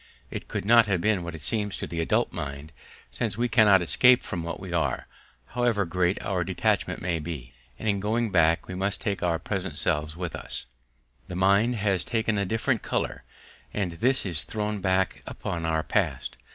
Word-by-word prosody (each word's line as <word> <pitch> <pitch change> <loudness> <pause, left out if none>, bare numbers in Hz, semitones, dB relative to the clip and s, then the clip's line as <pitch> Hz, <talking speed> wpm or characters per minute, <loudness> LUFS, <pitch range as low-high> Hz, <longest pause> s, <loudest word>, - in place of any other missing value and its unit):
It - - -6
could - - -4
not 115 +1 +6
have 95 -3 +1
been 105 0 +2
what 85 -1 -5
it 75 - -9
seems 105 0 -1
to - - -3
the 85 -1 -3
adult 80 - +1
mind, 70 +2 -6 0.4
since 110 -3 -2
we 120 +1 +1
cannot 105 -6 +5
escape 125 +8 +5
from 85 - -4
what 85 +1 -5
we 95 -2 -7
are, 85 -2 0 0.4
however 120 -5 +1
great 90 +1 +1
our - - 0
detachment - - 0
may 85 -2 0
be; 75 -7 -6 0.2
and 110 - -5
in 100 -2 +2
going 110 +2 0
back 85 -2 +3
we 95 - -6
must 95 +2 -1
take 100 -2 -2
our 85 -2 +1
present 95 +1 -4
selves 75 +2 -1
with 90 -1 -4
us: - - -4 0.6
the 90 - -6
mind 100 +6 +3
has 100 -4 +1
taken 110 -2 0
a 100 - +1
different 115 +4 0
colour, - - -2 0.5
and 95 -4 0
this 125 +10 +1
is 85 -5 +4
thrown 105 -1 -3
back 95 0 +1
upon 85 -1 -4
our 80 -1 +1
past. 70 - -1
95 Hz, 190 wpm, -27 LUFS, 85-110 Hz, 0.6 s, not